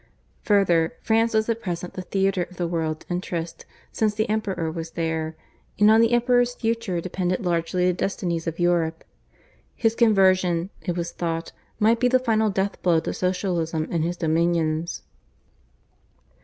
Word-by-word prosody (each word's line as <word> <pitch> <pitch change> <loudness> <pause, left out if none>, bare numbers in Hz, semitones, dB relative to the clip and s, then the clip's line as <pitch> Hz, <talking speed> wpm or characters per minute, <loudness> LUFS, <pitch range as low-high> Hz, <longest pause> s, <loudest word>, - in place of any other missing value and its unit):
Further, 175 -6 +3
France 225 0 +2
was 220 0 +2
at 230 -1 -1
present 175 -2 -4
the 185 - -5
theatre 195 0 0
of 180 - -16
the 175 - -1
world's 160 -2 -2
interest, 175 -2 -4 0.2
since 215 -1 0
the 220 +2 0
Emperor 195 -7 -1
was 165 0 -5
there, 160 -1 -2 0.4
and 210 +1 +6
on 220 +1 +6
the 230 0 +3
Emperor's 245 0 +3
future 225 -6 -1
depended 180 +1 -2
largely 175 +1 0
the 180 - +3
destinies 175 -2 -2
of 165 +1 -4
Europe: 170 -2 +1 0.7
his 225 -1 +1
conversion, 190 -5 +3
it 180 -2 -3
was 170 0 -3
thought, 165 -1 -3 0.3
might 225 +2 +3
be 250 - +3
the 255 +1 +4
final 220 -4 +1
death 195 0 -2
blow 170 -3 +3
to - - -4
Socialism 175 -4 -1
in 170 - 0
his 175 +2 -2
dominions. 165 0 0
180 Hz, 155 wpm, -24 LUFS, 165-215 Hz, 0.7 s, and